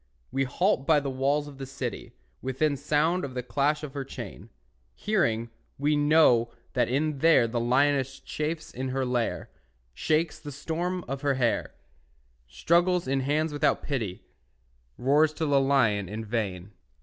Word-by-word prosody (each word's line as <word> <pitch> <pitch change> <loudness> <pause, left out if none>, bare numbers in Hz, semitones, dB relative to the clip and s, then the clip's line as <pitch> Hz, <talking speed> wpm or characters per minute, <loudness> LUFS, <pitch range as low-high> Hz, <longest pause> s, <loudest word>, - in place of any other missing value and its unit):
We 135 0 0
halt 140 +1 0
by 155 -2 +5
the 140 -1 -3
walls 140 +3 0
of 140 -2 -12
the 135 - -6
city, 135 -2 -6 0.3
Within 135 +3 0
sound 150 +5 +1
of 130 -2 -5
the 125 - -2
clash 145 +5 0
of 145 -3 -6
her 140 -2 -3
chain. 135 - -9 0.5
Hearing, 115 - 0 0.3
we 150 +2 +1
know 145 -6 +4 0.2
that 120 -3 +1
in 145 +2 0
there 160 -6 +5
The 120 +1 -2
lioness 135 +2 +1
chafes 155 +1 -4
in 130 +1 -4
her 130 0 -1
lair, 125 -2 -2 0.4
Shakes 155 - 0
the 145 - -8
storm 170 +5 -3
of 135 +2 -4
her 140 -2 +1
hair, 120 -3 0 0.7
Struggles 170 - +2
in 135 +1 +1
hands 150 +3 0
without 145 0 +1
pity, 115 -10 -3 0.7
Roars 150 +4 +3
to 160 - -2
the 140 -2 +3
lion 115 -9 +2
in 110 +2 -5
vain. 100 -4 -3
140 Hz, 160 wpm, -27 LUFS, 125-150 Hz, 0.7 s, by